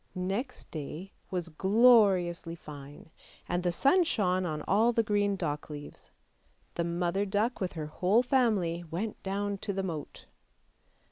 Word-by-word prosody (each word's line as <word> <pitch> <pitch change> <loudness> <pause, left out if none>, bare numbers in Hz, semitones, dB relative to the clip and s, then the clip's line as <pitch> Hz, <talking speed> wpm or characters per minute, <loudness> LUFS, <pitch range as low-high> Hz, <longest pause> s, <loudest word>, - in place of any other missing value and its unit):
Next 195 +8 -3
day 160 +5 -6 0.2
was 180 -3 -3
gloriously 190 -3 +4
fine, 145 -1 -11 0.4
and 175 0 -1
the 175 0 0
sun 280 - +4
shone 185 - 0
on 155 -2 -4
all 220 +5 +3
the 230 -1 +2
green 205 -1 +1
dock 150 -6 -3
leaves. 145 -1 -9 0.6
The 170 - -1
mother 175 +3 0
duck 205 +5 -1
with 185 - -2
her 155 -2 -4
whole 185 +9 +2
family 215 - +1
went 200 +7 -4
down 200 +1 -2
to 200 - -3
the 195 0 -2
moat. 160 -6 -6
185 Hz, 145 wpm, -30 LUFS, 170-205 Hz, 0.6 s, gloriously